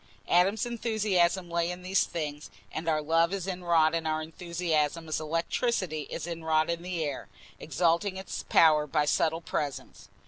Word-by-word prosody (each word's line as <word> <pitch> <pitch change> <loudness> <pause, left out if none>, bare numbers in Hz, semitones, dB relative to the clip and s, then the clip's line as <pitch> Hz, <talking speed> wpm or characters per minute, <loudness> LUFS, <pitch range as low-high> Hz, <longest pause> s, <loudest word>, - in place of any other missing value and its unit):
Adam's 195 +6 +3
enthusiasm 210 -6 +1
lay 170 0 0
in 180 0 -6
these 190 +1 +2
things; 150 -3 -5 0.2
and 165 +1 -3
our 155 -1 +1
love 165 +2 +3
is 195 -3 -3
inwrought 170 -4 +2
in 165 -1 -1
our 155 0 0
enthusiasm 165 -1 -2
as 155 - -1
electricity 165 - -1
is - - -5
inwrought 160 -1 0
in 170 0 -3
the 175 -2 -3
air, 145 -3 -4 0.3
exalting 175 +4 +1
its 190 0 -5
power 155 -2 +5
by 150 +1 +1
a - - -3
subtle 165 +2 +1
presence. 145 -4 -5
170 Hz, 165 wpm, -29 LUFS, 155-180 Hz, 0.3 s, power